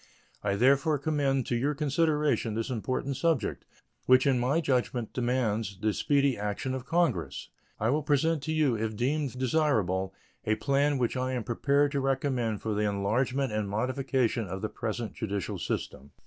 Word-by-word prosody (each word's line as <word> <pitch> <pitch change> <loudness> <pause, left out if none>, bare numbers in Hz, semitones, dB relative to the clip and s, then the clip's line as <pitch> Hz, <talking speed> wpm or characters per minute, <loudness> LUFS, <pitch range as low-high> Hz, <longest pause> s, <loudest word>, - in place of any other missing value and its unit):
I 100 -1 +1
therefore 140 +6 +3
commend 140 -3 0
to 120 - -1
your 140 +5 0
consideration 150 -5 +1
this 115 +4 -2
important 130 +3 -2
subject, 160 -10 0 0.4
which 130 0 +6
in 135 -3 +3
my 130 +6 +2
judgment 125 -5 -1
demands 115 -5 -1
the 105 +1 +1
speedy 140 -1 +2
action 105 +5 -2
of 130 0 -5
Congress. 115 - 0 0.3
I 110 +3 +1
will 150 +3 +1
present 150 +2 +1
to 160 - -2
you, 155 -6 +2
if 110 0 -2
deemed 135 +2 -1
desirable, 110 - +1 0.3
a 110 -1 +1
plan 140 +4 +1
which 125 -1 0
I 130 0 -1
am 125 -3 -2
prepared 140 +6 +1
to 140 -1 -1
recommend 130 -5 -1
for 110 - -1
the 105 0 +1
enlargement 120 +6 0
and 105 -2 -1
modification 125 0 0
of 95 +2 -6
the 110 - -1
present 110 +1 -4
judicial 100 -3 -3
system. 70 +2 -4
130 Hz, 165 wpm, -29 LUFS, 110-140 Hz, 0.4 s, which